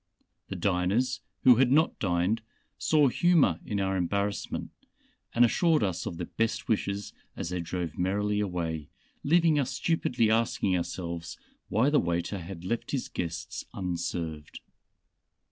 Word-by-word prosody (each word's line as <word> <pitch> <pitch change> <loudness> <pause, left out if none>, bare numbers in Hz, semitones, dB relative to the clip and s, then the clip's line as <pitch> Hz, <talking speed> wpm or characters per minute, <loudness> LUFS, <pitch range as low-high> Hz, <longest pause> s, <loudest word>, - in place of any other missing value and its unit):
The 95 - -5
diners 100 +8 +1 0.2
who 125 -3 +8
had 130 0 +4
not 155 +4 +3
dined 95 +4 +1 0.4
saw 150 -3 +4
humor 155 - +3
in 105 - -2
our 95 0 0
embarrassment, 100 +3 -2 0.6
and 120 +1 +7
assured 160 +2 +3
us 95 -4 -1
of 85 - -5
their - - -3
best 115 0 -2
wishes 100 -2 -1 0.2
as - - -3
they 90 0 -2
drove 85 -1 -4
merrily 105 +3 +1
away, 85 -6 -2 0.3
leaving 165 0 +4
us 135 -2 0
stupidly 125 -6 +1
asking 110 -4 +2
ourselves 85 -1 -4 0.3
why 125 +7 +3
the 150 - +5
waiter 85 +3 -1
had 85 0 -8
left 115 +5 -2
his 135 -3 -2
guests 85 -1 -4
unserved. 85 -4 -4
100 Hz, 140 wpm, -28 LUFS, 85-120 Hz, 0.6 s, who